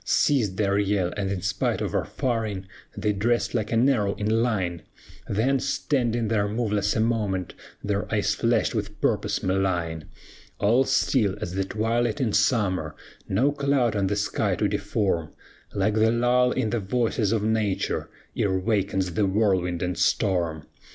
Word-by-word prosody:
"Ceased 115 -11 +2
their 100 -1 +1
yell, 100 -3 0
and 100 -2 -2
in 95 -3 -3
spite 95 0 0
of - - -3
our - - 0
firing 110 -6 -2 0.3
They 105 - 0
dressed 115 +4 0
like 110 -3 -1
an 115 +3 +3
arrow 105 -8 +1
in 110 +2 +1
line, 95 -8 -1 0.5
Then, 130 +7 +1
standing 120 -4 0
there 105 -2 +1
moveless 105 -2 0
a - - +1
moment, 105 -5 -1 0.3
Their - - -2
eyes - - +1
flashed - - +1
with - - -4
purpose - - 0
malign, 90 -4 -1 0.5
All 120 +6 +3
still 105 -9 +2
as 90 - -5
the 95 0 -1
twilight 115 +3 0
in 120 -6 0
summer, 100 - +1 0.3
No 125 +10 +2
cloud 140 -5 +1
on 100 -2 +1
the 105 - 0
sky 100 0 0
to - - +1
deform, 85 -7 -1 0.4
Like 100 +2 +1
the 110 +1 +3
lull 125 +1 +3
in 110 - -1
the 120 - 0
voices 110 0 0
of 110 -2 +1
nature 110 -3 -1 0.3
Ere 95 -2 +1
wakens 95 -2 0
the 100 +3 +1
whirlwind 95 -4 +1
and 90 0 -1
storm. 85 -5 0
105 Hz, 160 wpm, -25 LUFS, 95-115 Hz, 0.5 s, an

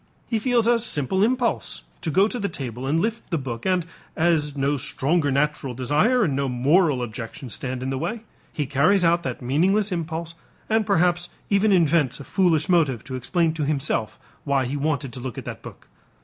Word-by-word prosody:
He 225 - -1
feels 240 -1 +2
a 235 0 +4
simple 190 - -1
impulse 245 +1 0 0.2
to - - -2
go 190 +6 +4
to 245 +2 -4
the 200 -2 -1
table 130 -4 -5
and 155 +4 +2
lift 225 +5 -2
the 170 - 0
book 125 -3 -5
and, 180 -3 +1 0.3
as 155 -3 +1
no 140 +1 +1
stronger 145 +3 0
natural 140 -2 0
desire 150 - +2
and 145 -8 0
no 140 0 0
moral 135 +2 +3
objection 120 +3 -7
stand 130 +2 -4
in 130 - -2
the 135 - -2
way, 215 - -3 0.3
he 150 - -2
carries 155 +8 +3
out 170 +1 +3
that 165 - -5
meaningless 190 - +2
impulse 165 -1 -3 0.3
and 220 -1 +1
perhaps 175 +1 +2 0.2
even 200 +1 +4
invents 160 -7 +3
a - - -7
foolish 165 -2 +2
motive 155 -10 +2
to 130 - -6
explain 160 +6 0
to 160 -2 -3
himself 140 -6 -1 0.3
why 140 -2 +1
he 130 +4 -3
wanted 140 -3 -1
to 125 - -6
look 125 -2 -6
at - - -6
that - - -7
book. - - -12
155 Hz, 195 wpm, -24 LUFS, 135-185 Hz, 0.3 s, a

